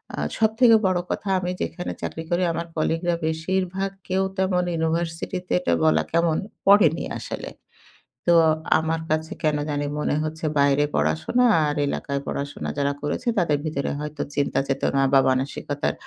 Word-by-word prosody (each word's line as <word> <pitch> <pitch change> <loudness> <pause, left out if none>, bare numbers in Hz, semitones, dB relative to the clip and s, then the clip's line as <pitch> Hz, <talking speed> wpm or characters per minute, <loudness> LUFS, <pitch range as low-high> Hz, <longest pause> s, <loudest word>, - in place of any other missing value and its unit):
আ - - -19 0.2
সবথেকে 225 +2 +5
বড় 185 -1 +1
কথা, - - -3
আমি 180 0 -2
যেখানে 180 - -3
চাকরি 160 - -4
করি, 175 +1 +1
আমার 170 +1 -4
কলিগরা 165 +2 0
বেশিরভাগ 190 +4 -1 0.2
কেউ 190 +1 +1
তেমন 185 -1 +1
ইউনিভার্সিটিতে 165 +3 -2
এটা 85 - 0
বলা 80 0 +4
কেমন? 165 -1 +2 0.3
পড়েনি 195 -5 +5
আসলে। - - -6 0.8
তো 175 - +6 0.5
আমার 160 0 -1
কাছে 155 +1 -1
কেন 150 -1 +2
জানি 145 0 -1
মনে 150 - 0
হচ্ছে 160 +1 -4
বাইরে 140 +1 +4
পড়াশোনা 80 - +1 0.2
আর 145 0 -1
এলাকায় 140 0 -2
পড়াশোনা 140 0 -4
যারা 140 0 +1
করেছে 145 - -3
তাদের 155 -5 +2
ভিতরে 150 -3 -2
হয়তো 150 0 -5
চিন্তা 145 -1 +1
চেতনা 135 0 0
বা 135 - +8
মানসিকতার 135 +2 -1
160 Hz, 150 wpm, -24 LUFS, 145-180 Hz, 0.8 s, বা